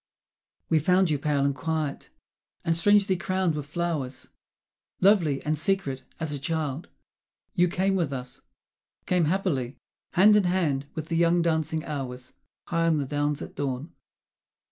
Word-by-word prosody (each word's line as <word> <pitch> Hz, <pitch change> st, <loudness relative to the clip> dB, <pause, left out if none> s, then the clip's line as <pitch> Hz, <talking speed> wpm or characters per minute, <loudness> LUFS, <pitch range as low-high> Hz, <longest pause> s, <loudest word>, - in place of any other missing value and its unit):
(We 160 Hz, -, +3 dB
found 180 Hz, +2 st, +3 dB
you 145 Hz, -, +1 dB
pale 145 Hz, -1 st, +1 dB
and 140 Hz, -, +2 dB
quiet, 155 Hz, +1 st, -3 dB, 0.6 s
and 165 Hz, -, +2 dB
strangely 200 Hz, +2 st, +4 dB
crowned 185 Hz, 0 st, 0 dB
with 150 Hz, -2 st, -5 dB
flowers, 150 Hz, -5 st, -3 dB, 0.7 s
Lovely 175 Hz, -8 st, +3 dB
and 155 Hz, +1 st, 0 dB
secret 155 Hz, -5 st, -1 dB, 0.2 s
as 160 Hz, -2 st, -3 dB
a 145 Hz, -, -4 dB
child. 155 Hz, 0 st, -3 dB, 0.7 s
You 175 Hz, +1 st, +3 dB
came 190 Hz, +3 st, +1 dB
with 170 Hz, -7 st, 0 dB
us, 125 Hz, -2 st, -7 dB, 0.6 s
Came 180 Hz, -3 st, +2 dB
happily, 150 Hz, -8 st, -1 dB, 0.4 s
hand 210 Hz, +4 st, +6 dB
in 205 Hz, -2 st, +4 dB
hand 155 Hz, -7 st, 0 dB
with 160 Hz, 0 st, -5 dB
the 165 Hz, -, 0 dB
young 170 Hz, 0 st, +3 dB
dancing 160 Hz, -1 st, 0 dB
hours, 130 Hz, -4 st, -5 dB, 0.3 s
High 165 Hz, -1 st, 0 dB
on 160 Hz, -2 st, +3 dB
the 145 Hz, -, -1 dB
downs 145 Hz, +1 st, -1 dB
at -, -, -9 dB
dawn!) 140 Hz, +2 st, -4 dB
160 Hz, 150 wpm, -26 LUFS, 140-175 Hz, 0.7 s, hand